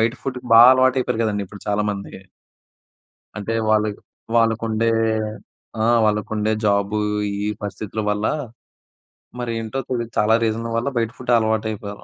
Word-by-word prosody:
బయట 115 +2 +2
ఫుడ్‌కు 125 -1 -5
బా 115 - +10
అలవాటయిపోయారు 130 -2 +2
కదండీ! 105 -2 -1
ఇప్పుడు 100 +1 -12
చాలామంది. 105 -1 -2 1.2
అంటే 105 +2 -3 0.2
వాళ్ళ 110 0 +3 0.5
వాళ్ళకుండే 115 0 +1 0.9
ఆహ్, 120 +1 +4
వాళ్ళకుండే 105 0 0
ఆ! - - -8
జాబు 100 0 +1 0.4
ఈ 100 +1 -3 0.2
పరిస్థితుల 105 +1 -5
వల్ల 105 +1 -1 1.1
మరి 120 -1 -3
ఏంటో 115 +4 -4
తెలీదు 120 -2 -3
చాలా 110 +1 +4
రీజన్‌ 115 +1 -1
వల్ల 120 +4 0
బయట 115 -1 0
ఫుడ్ 125 -1 -3
అలవాటు 110 -1 0
అయిపోయారు. 100 -1 -8
110 Hz, 135 wpm, -21 LUFS, 105-115 Hz, 1.2 s, బా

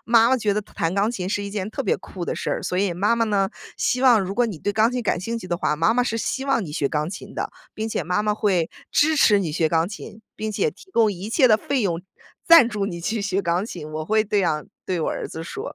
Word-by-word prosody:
“妈 230 0 +5
妈 260 - +4
觉 210 -4 0
得 210 - 0
弹 175 -3 -3
钢 205 +3 +2
琴 185 -6 -4
是 205 +1 -1
一 200 - -4
件 205 0 -4
特 275 - -3
别 - - +1
酷 180 -2 -8
的 - - -1
事 - - -3
儿， - - -2
所 180 - -2
以 195 -2 +1
妈 205 +6 +1
妈 230 - +2
呢， 200 -3 +1 0.3
希 250 +1 0
望 240 -5 +6
如 190 +1 -3
果 245 - +3
你 200 -9 -4
对 205 - -1
钢 220 +4 +2
琴 250 -1 -2
感 205 - 0
兴 230 +6 -3
趣 185 - -9
的 175 - -1
话， 150 - 0
妈 190 +9 +3
妈 245 - +3
是 230 -2 -2
希 265 +4 -2
望 270 -5 +1
你 155 - -6
学 145 -2 0
钢 150 +1 -1
琴 185 - -8
的， - - -3 0.2
并 220 +1 -4
且 - - -2
妈 180 +4 0
妈 210 0 +1
会 185 -6 +1 0.2
支 310 +1 +3
持 210 -7 +5
你 175 -5 -2
学 160 +1 +1
钢 165 +2 +1
琴， 215 +1 -9 0.2
并 215 0 -3
且 450 - +1
提 385 -2 -18
供 225 - +3
一 195 +3 -6
切 255 -1 +4
的 215 - +6
费 265 +3 -1
用 175 -4 -1 0.4
赞 330 -8 +8
助 210 -3 -2
你 175 -4 -4
去 215 +5 -2
学 195 -1 0
钢 175 +1 0
琴。” 170 -8 -7
我 155 0 -4
会 215 +5 +2
这 210 -1 0
样 155 -5 0 0.2
对 180 -3 -2
我 - - 0
儿 - - -3
子 160 - -7
说。 410 - -6
205 Hz, 305 characters per minute, -23 LUFS, 180-230 Hz, 0.4 s, 赞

